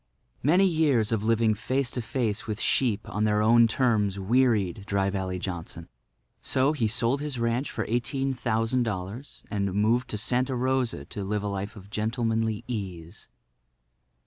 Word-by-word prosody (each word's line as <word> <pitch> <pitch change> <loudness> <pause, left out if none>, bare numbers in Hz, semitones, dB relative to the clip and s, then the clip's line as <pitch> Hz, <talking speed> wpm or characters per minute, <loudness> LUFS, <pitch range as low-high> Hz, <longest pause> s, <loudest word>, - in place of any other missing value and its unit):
Many 175 +8 +4
years 150 - +2
of 110 -2 0
living 115 0 +3
face 130 +4 -1
to 125 - -3
face 110 -2 -2
with 110 -1 -3
sheep 115 -5 +1
on 105 - -2
their 105 0 +2
own 115 +1 +6
terms 110 -5 +1
wearied 105 -2 +1
Dry 100 -1 +1
Valley 95 -2 -2
Johnson. 85 -2 -6 0.5
So, 135 +3 +2
he 120 -7 0
sold 120 +4 +1
his 145 -3 -3
ranch 115 +3 0
for - - -3
eighteen 135 +3 0
thousand 115 0 0
dollars 105 +4 -5
and 100 -3 -1
moved 115 +4 +2
to 105 - -3
Santa 125 +4 0
Rosa 125 - 0
to 100 - -6
live 105 +1 -2
a - - -2
life 100 +2 -4
of 100 -1 -13
gentlemanly 115 0 -1
ease. 95 -6 -6
110 Hz, 160 wpm, -27 LUFS, 100-125 Hz, 0.5 s, own